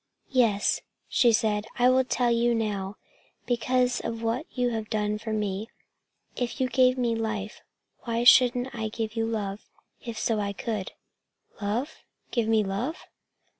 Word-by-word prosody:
"Yes," 230 Hz, -6 st, +2 dB, 0.3 s
she 240 Hz, -, +4 dB
said, 215 Hz, -2 st, +1 dB
"I 245 Hz, 0 st, +5 dB
will 260 Hz, 0 st, +4 dB
tell 245 Hz, -1 st, +1 dB
you 235 Hz, 0 st, +2 dB
now, 205 Hz, -3 st, -2 dB, 0.5 s
because 250 Hz, +1 st, +1 dB
of 230 Hz, 0 st, -4 dB
what 230 Hz, +2 st, -1 dB
you 250 Hz, -1 st, 0 dB
have 220 Hz, -2 st, -4 dB
done 210 Hz, 0 st, -1 dB
for 220 Hz, 0 st, -5 dB
me. 210 Hz, 0 st, -2 dB, 0.7 s
If 245 Hz, +3 st, -3 dB
you 260 Hz, -, +2 dB
gave 255 Hz, +1 st, +4 dB
me 240 Hz, -2 st, +1 dB
life, 215 Hz, -2 st, -3 dB, 0.4 s
why 235 Hz, -1 st, -2 dB
shouldn't 250 Hz, +1 st, +6 dB
I 220 Hz, -2 st, -3 dB
give 220 Hz, 0 st, -4 dB
you 225 Hz, 0 st, 0 dB
love 210 Hz, -2 st, -4 dB, 0.3 s
if 235 Hz, -2 st, -6 dB
so 220 Hz, -1 st, 0 dB
I 200 Hz, -1 st, -2 dB
could?" 210 Hz, -2 st, -4 dB, 0.7 s
"Love? 235 Hz, +9 st, -2 dB, 0.3 s
Give 235 Hz, -3 st, 0 dB
me 220 Hz, -1 st, +3 dB
love?" 205 Hz, -, -3 dB
225 Hz, 155 wpm, -27 LUFS, 215-245 Hz, 0.7 s, shouldn't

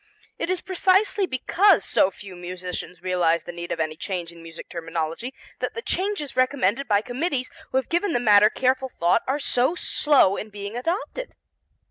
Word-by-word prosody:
It -, -, -2 dB
is 370 Hz, -1 st, 0 dB
precisely 380 Hz, +2 st, +2 dB
because 355 Hz, +8 st, +3 dB
so 185 Hz, -, +3 dB
few 190 Hz, 0 st, -11 dB
musicians 180 Hz, 0 st, -6 dB
realize 175 Hz, -3 st, +1 dB
the 175 Hz, -, -7 dB
need 170 Hz, 0 st, -7 dB
of -, -, -2 dB
any 155 Hz, -1 st, -1 dB
change 175 Hz, 0 st, -4 dB
in 170 Hz, 0 st, -14 dB
music 165 Hz, 0 st, -10 dB
terminology 165 Hz, +7 st, -4 dB, 0.3 s
that -, -, -3 dB
the 460 Hz, -, -5 dB
changes 375 Hz, -7 st, -2 dB
recommended 255 Hz, -1 st, +1 dB
by 205 Hz, -1 st, +3 dB
committees 255 Hz, +2 st, -2 dB, 0.2 s
who -, -, 0 dB
have 265 Hz, -, 0 dB
given 345 Hz, +1 st, 0 dB
the -, -, +2 dB
matter 210 Hz, -2 st, +6 dB
careful 260 Hz, +2 st, 0 dB
thought 175 Hz, +1 st, +2 dB
are 270 Hz, +2 st, +1 dB
so 270 Hz, +2 st, +1 dB
slow 280 Hz, -, +3 dB
in 215 Hz, -, -6 dB
being 205 Hz, +1 st, -7 dB
adopted. 370 Hz, -, -3 dB
240 Hz, 175 wpm, -24 LUFS, 180-295 Hz, 0.3 s, matter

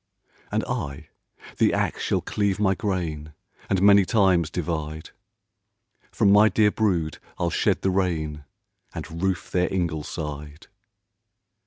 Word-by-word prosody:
"And -, -, 0 dB
I 70 Hz, -1 st, -4 dB, 0.5 s
the -, -, +3 dB
ax -, -, -1 dB
shall -, -, 0 dB
cleave 100 Hz, -1 st, -1 dB
my 95 Hz, -2 st, +3 dB
grain, 85 Hz, -6 st, -3 dB, 0.4 s
And 95 Hz, -1 st, +1 dB
many 100 Hz, 0 st, +7 dB
times 95 Hz, -5 st, +2 dB
divide; 80 Hz, -3 st, -4 dB, 1.0 s
From 105 Hz, -3 st, +3 dB
my 105 Hz, +2 st, +6 dB
dear 105 Hz, +1 st, +3 dB
brood 90 Hz, -9 st, 0 dB, 0.2 s
I'll 85 Hz, -1 st, -1 dB
shed -, -, +1 dB
the 95 Hz, -, +2 dB
rain, 80 Hz, -6 st, -1 dB, 0.5 s
And 85 Hz, +1 st, -6 dB
roof 95 Hz, -3 st, -1 dB
their 90 Hz, 0 st, +1 dB
ingleside." 75 Hz, -4 st, -4 dB
90 Hz, 125 wpm, -24 LUFS, 80-95 Hz, 1.0 s, many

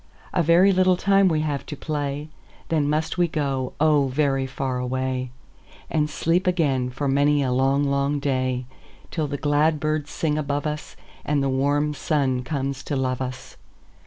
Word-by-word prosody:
"A -, -, +2 dB
very 170 Hz, +4 st, +5 dB
little 185 Hz, -1 st, +3 dB
time 195 Hz, +1 st, +4 dB
we 160 Hz, -3 st, +1 dB
have 145 Hz, -3 st, -2 dB
to 150 Hz, -, -5 dB
play, 145 Hz, -1 st, -3 dB, 0.4 s
Then 150 Hz, -3 st, +1 dB
must 155 Hz, +3 st, -1 dB
we 175 Hz, -, +4 dB
go, 135 Hz, -5 st, -2 dB
oh, 150 Hz, -2 st, +4 dB
very 135 Hz, 0 st, 0 dB
far 130 Hz, -1 st, -3 dB
away, 130 Hz, 0 st, -2 dB, 0.6 s
And 150 Hz, -1 st, +1 dB
sleep 170 Hz, +4 st, 0 dB
again 140 Hz, -8 st, +1 dB
for 135 Hz, +3 st, -3 dB
many 145 Hz, +1 st, +3 dB
a 130 Hz, -, 0 dB
long, 135 Hz, +2 st, +2 dB
long 140 Hz, +1 st, +1 dB
day, 130 Hz, -2 st, -1 dB, 0.5 s
Till 155 Hz, -3 st, -1 dB
the 145 Hz, 0 st, -3 dB
glad 150 Hz, +2 st, +2 dB
birds 155 Hz, -1 st, -1 dB
sing 155 Hz, -1 st, -1 dB
above 145 Hz, 0 st, -2 dB
us, 150 Hz, 0 st, -4 dB, 0.3 s
And 145 Hz, -1 st, 0 dB
the 135 Hz, -, +1 dB
warm 145 Hz, +3 st, +1 dB
sun 140 Hz, -4 st, 0 dB
comes 135 Hz, 0 st, -3 dB
to 145 Hz, -, -2 dB
love 130 Hz, -1 st, -1 dB
us. 130 Hz, 0 st, -6 dB
145 Hz, 170 wpm, -24 LUFS, 135-155 Hz, 0.6 s, very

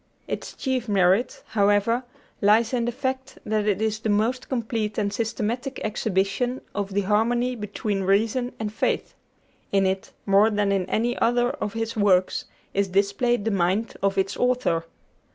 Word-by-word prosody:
Its -, -, -5 dB
chief 255 Hz, -4 st, -2 dB
merit, 195 Hz, +4 st, +2 dB
however, 205 Hz, +3 st, +2 dB, 0.4 s
lies 220 Hz, +3 st, +4 dB
in 240 Hz, -2 st, +1 dB
the 240 Hz, -, 0 dB
fact 260 Hz, +1 st, -4 dB
that 215 Hz, -1 st, 0 dB
it 205 Hz, -2 st, +2 dB
is 220 Hz, 0 st, 0 dB
the 220 Hz, -, -2 dB
most 230 Hz, +5 st, 0 dB
complete 225 Hz, -4 st, -2 dB
and 205 Hz, -2 st, 0 dB
systematic 235 Hz, +4 st, -2 dB
exhibition 215 Hz, +4 st, 0 dB
of 200 Hz, -1 st, -3 dB
the 205 Hz, -, +3 dB
harmony 235 Hz, +5 st, +1 dB
between 210 Hz, -2 st, -3 dB
reason 220 Hz, +6 st, +1 dB
and 210 Hz, -1 st, -3 dB
faith. -, -, -1 dB, 0.6 s
In 195 Hz, -1 st, +3 dB
it, 190 Hz, 0 st, -1 dB
more 200 Hz, +2 st, +5 dB
than 205 Hz, -2 st, +1 dB
in 190 Hz, -2 st, 0 dB
any 240 Hz, +4 st, +1 dB
other 240 Hz, +1 st, +2 dB
of 210 Hz, -, -4 dB
his 225 Hz, 0 st, -3 dB
works, 190 Hz, -3 st, +2 dB, 0.3 s
is 200 Hz, 0 st, +1 dB
displayed 200 Hz, +4 st, +1 dB
the 225 Hz, -, +1 dB
mind 195 Hz, +4 st, +1 dB
of 195 Hz, 0 st, +1 dB
its 195 Hz, 0 st, +1 dB
author. 250 Hz, -10 st, +1 dB
215 Hz, 160 wpm, -25 LUFS, 200-240 Hz, 0.6 s, more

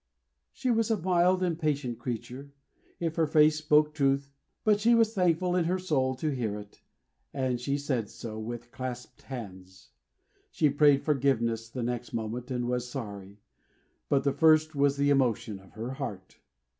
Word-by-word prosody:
She 255 Hz, -2 st, -1 dB
was 225 Hz, -1 st, +1 dB
a 225 Hz, -, +2 dB
mild 180 Hz, +1 st, +2 dB
and 170 Hz, -3 st, -1 dB
patient 145 Hz, -7 st, -1 dB
creature, 125 Hz, +3 st, -6 dB, 0.5 s
if 165 Hz, -1 st, -2 dB
her 160 Hz, -1 st, +3 dB
face 155 Hz, 0 st, +4 dB
spoke 150 Hz, 0 st, +3 dB
truth; 140 Hz, -1 st, +1 dB, 0.3 s
but 210 Hz, -1 st, +3 dB
she 235 Hz, +3 st, +4 dB
was 225 Hz, -1 st, +3 dB
thankful 180 Hz, -2 st, +1 dB
in 175 Hz, -2 st, +2 dB
her 180 Hz, +3 st, +1 dB
soul 135 Hz, -8 st, 0 dB
to 150 Hz, +4 st, -2 dB
hear 110 Hz, -5 st, -2 dB
it, 105 Hz, 0 st, -12 dB, 0.5 s
and 130 Hz, -3 st, -1 dB
she 140 Hz, +2 st, -1 dB
said 130 Hz, -7 st, -2 dB
so, 110 Hz, -2 st, -7 dB
with 120 Hz, +2 st, -7 dB
clasped 125 Hz, -1 st, -7 dB
hands. 95 Hz, -7 st, -10 dB, 0.6 s
She 150 Hz, -3 st, +2 dB
prayed 145 Hz, -1 st, +4 dB
forgiveness 115 Hz, -6 st, 0 dB
the 125 Hz, +1 st, -4 dB
next 120 Hz, 0 st, -4 dB
moment, 115 Hz, +2 st, -4 dB
and 125 Hz, -2 st, -2 dB
was 125 Hz, 0 st, -2 dB
sorry: 100 Hz, -5 st, -7 dB, 0.7 s
but 140 Hz, -1 st, +2 dB
the 140 Hz, -, +1 dB
first 155 Hz, 0 st, +4 dB
was 140 Hz, -1 st, +2 dB
the 140 Hz, 0 st, +2 dB
emotion 120 Hz, -6 st, +1 dB
of 95 Hz, 0 st, -19 dB
her 115 Hz, +4 st, -5 dB
heart. 110 Hz, -9 st, -7 dB
135 Hz, 170 wpm, -29 LUFS, 120-155 Hz, 0.7 s, face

